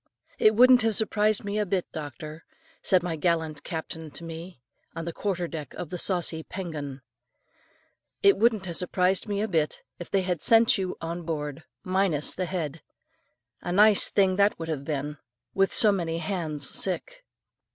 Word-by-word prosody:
"It 215 Hz, 0 st, +5 dB
wouldn't 250 Hz, +2 st, +7 dB
have 220 Hz, -1 st, +3 dB
surprised 215 Hz, -1 st, +1 dB
me 205 Hz, +1 st, -2 dB
a 210 Hz, -, +1 dB
bit, 185 Hz, -1 st, 0 dB
doctor," 155 Hz, +1 st, -8 dB, 0.4 s
said 185 Hz, -2 st, +3 dB
my 175 Hz, -2 st, -2 dB
gallant 160 Hz, -2 st, -1 dB
captain 160 Hz, -1 st, -6 dB
to 170 Hz, -, -11 dB
me, 165 Hz, -1 st, -8 dB, 0.4 s
on 165 Hz, -1 st, -5 dB
the 170 Hz, -, -4 dB
quarter 180 Hz, -3 st, -2 dB
deck 155 Hz, -5 st, -7 dB
of 170 Hz, -, -7 dB
the 180 Hz, -, -3 dB
saucy 175 Hz, -4 st, 0 dB
Pen 180 Hz, +1 st, -6 dB
gun, 140 Hz, -3 st, -6 dB, 1.2 s
"It 395 Hz, -1 st, +7 dB
wouldn't 220 Hz, -4 st, +2 dB
have 170 Hz, -2 st, -3 dB
surprised 180 Hz, +2 st, +1 dB
me 205 Hz, -1 st, -1 dB
a -, -, -1 dB
bit, 160 Hz, -6 st, -1 dB, 0.2 s
if 175 Hz, -, -8 dB
they 195 Hz, -1 st, +1 dB
had 180 Hz, -4 st, -2 dB
sent 225 Hz, 0 st, +5 dB
you 185 Hz, -1 st, -3 dB
on 170 Hz, +1 st, -4 dB
board, 155 Hz, -2 st, -5 dB, 0.2 s
minus 185 Hz, -5 st, 0 dB
the 185 Hz, -, -2 dB
head. 165 Hz, -4 st, -4 dB, 0.8 s
A -, -, -4 dB
nice 210 Hz, +2 st, +6 dB
thing 190 Hz, -2 st, +2 dB
that 200 Hz, +1 st, +3 dB
would 165 Hz, 0 st, -6 dB
have 145 Hz, -3 st, -3 dB
been, 145 Hz, 0 st, -4 dB, 0.3 s
with 195 Hz, 0 st, +2 dB
so 215 Hz, -, +6 dB
many 170 Hz, -4 st, -2 dB
hands 160 Hz, -5 st, -3 dB
sick." -, -, -3 dB
175 Hz, 175 wpm, -26 LUFS, 160-200 Hz, 1.2 s, wouldn't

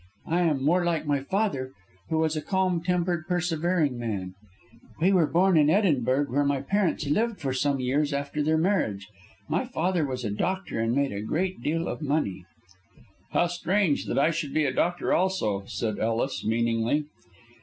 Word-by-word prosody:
I 170 Hz, +2 st, +1 dB
am 150 Hz, -6 st, +1 dB
more 175 Hz, +4 st, +3 dB
like 170 Hz, -2 st, 0 dB
my 145 Hz, -1 st, +1 dB
father, 140 Hz, -5 st, -1 dB, 0.4 s
who 160 Hz, -, 0 dB
was 160 Hz, 0 st, +1 dB
a 155 Hz, -, -2 dB
calm 185 Hz, 0 st, 0 dB
tempered, 175 Hz, -2 st, -1 dB
persevering 170 Hz, -5 st, 0 dB
man. 100 Hz, -6 st, -4 dB, 0.7 s
We 180 Hz, +5 st, +3 dB
were 170 Hz, -5 st, +4 dB
born 180 Hz, +2 st, +3 dB
in 150 Hz, 0 st, +4 dB
Edinburgh, 145 Hz, -, +2 dB
where 145 Hz, +3 st, +2 dB
my 140 Hz, -1 st, 0 dB
parents 195 Hz, -6 st, 0 dB
lived 220 Hz, +9 st, 0 dB
for 135 Hz, -2 st, -2 dB
some 140 Hz, +1 st, 0 dB
years 140 Hz, +4 st, 0 dB
after 140 Hz, +1 st, -2 dB
their 155 Hz, +2 st, +2 dB
marriage. 160 Hz, -, 0 dB, 0.4 s
My -, -, 0 dB
father 180 Hz, -8 st, 0 dB
was 130 Hz, -3 st, -3 dB
a 105 Hz, -, -1 dB
doctor, 185 Hz, -, -2 dB
and 115 Hz, +2 st, +1 dB
made 140 Hz, -1 st, +1 dB
a 100 Hz, -, -4 dB
great 175 Hz, -, -2 dB
deal 165 Hz, +5 st, -1 dB
of -, -, -4 dB
money." 140 Hz, -, -1 dB, 0.8 s
"How -, -, +2 dB
strange 175 Hz, -1 st, 0 dB
that -, -, -2 dB
I 145 Hz, +4 st, +4 dB
should 155 Hz, -3 st, -4 dB
be 155 Hz, -1 st, +3 dB
a 130 Hz, -, 0 dB
doctor 175 Hz, +6 st, 0 dB
also," 110 Hz, -, 0 dB
said 110 Hz, -3 st, -3 dB
Ellis, 115 Hz, +4 st, -1 dB
meaningly. 115 Hz, +5 st, +1 dB
150 Hz, 175 wpm, -26 LUFS, 130-175 Hz, 0.8 s, were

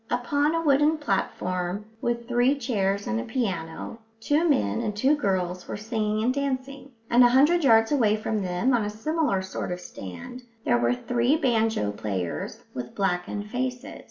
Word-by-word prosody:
Upon 285 Hz, +6 st, +1 dB
a 330 Hz, -, +1 dB
wooden 295 Hz, +1 st, +4 dB
platform, 190 Hz, -6 st, -2 dB, 0.2 s
with 235 Hz, 0 st, -2 dB
three 245 Hz, +3 st, +2 dB
chairs 200 Hz, -6 st, -1 dB
and 110 Hz, -, -1 dB
a -, -, -3 dB
piano, 185 Hz, -, -3 dB, 0.2 s
two 300 Hz, +8 st, +2 dB
men 105 Hz, -, +1 dB
and 210 Hz, -1 st, -3 dB
two 270 Hz, +7 st, +4 dB
girls 185 Hz, -8 st, -1 dB
were -, -, -4 dB
singing 215 Hz, 0 st, -1 dB
and 250 Hz, +2 st, +2 dB
dancing; 275 Hz, 0 st, -4 dB
and 240 Hz, +2 st, +5 dB
a 245 Hz, -, +7 dB
hundred 295 Hz, +7 st, +4 dB
yards 225 Hz, -3 st, +5 dB
away 225 Hz, -7 st, +3 dB
from 215 Hz, 0 st, -2 dB
them, 185 Hz, +8 st, 0 dB
on 235 Hz, -3 st, +2 dB
a 205 Hz, -, -2 dB
similar 225 Hz, -, -1 dB
sort 190 Hz, -1 st, -5 dB
of 180 Hz, -, -3 dB
stand, 95 Hz, -, -9 dB, 0.2 s
there 120 Hz, -, +3 dB
were 120 Hz, +1 st, +2 dB
three 245 Hz, -, +1 dB
banjo 225 Hz, -, +1 dB
players 95 Hz, -4 st, -4 dB
with 125 Hz, -1 st, -6 dB
blackened 195 Hz, +2 st, -2 dB
faces. 250 Hz, 0 st, -3 dB
225 Hz, 170 wpm, -26 LUFS, 185-265 Hz, 0.2 s, a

